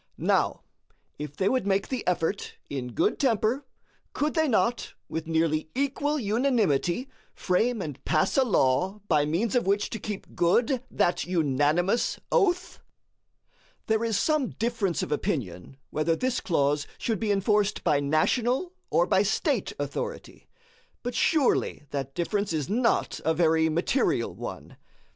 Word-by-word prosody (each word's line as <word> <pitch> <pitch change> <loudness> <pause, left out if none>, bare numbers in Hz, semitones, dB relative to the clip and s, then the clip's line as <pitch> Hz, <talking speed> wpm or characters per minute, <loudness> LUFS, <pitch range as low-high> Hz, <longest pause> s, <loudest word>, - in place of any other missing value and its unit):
Now, - - +1 0.6
if 150 -1 -6
they 190 - +1
would 255 -2 +1
make 195 0 +1
the 255 -3 -2
effort 180 +2 -1 0.2
in 125 -3 -4
good - - +1
temper, 255 +1 +1 0.5
could 300 +1 0
they 315 -1 +2
not 235 0 0
with 160 0 -4
nearly 160 -1 0
equal 280 +2 0
unanimity 220 - +1 0.3
frame 220 +3 +1
and 145 -3 -7
pass 155 - +1
a 270 - +5
law 190 - +1
by 150 -5 +3
means 185 +9 0
of 245 -6 +1
which 200 +1 +1
to 225 - -4
keep 205 -1 -7
good 235 +9 +2
that 175 - +1
unanimous 165 - +1
oath? 365 -6 +1 1.1
There 220 0 +1
is 225 -2 +1
some 305 -5 +1
difference 225 -6 -1
of - - -5
opinion 135 - -3
whether 155 +2 +1
this 255 +5 -1
clause 145 -3 +1
should 225 -4 -2
be 215 -2 0
enforced 205 +1 +1
by 145 - +3
national 240 - +1 0.2
or - - +3
by - - +3
State - - 0
authority; 480 0 -5 0.6
but 245 0 -3
surely 295 - +2
that 135 -1 -4
difference 200 +2 -1
is 150 -3 -1
not 230 +4 +1
a 160 - +1
very 160 -1 +3
material 170 - 0
one. - - -8
200 Hz, 145 wpm, -27 LUFS, 160-245 Hz, 1.1 s, a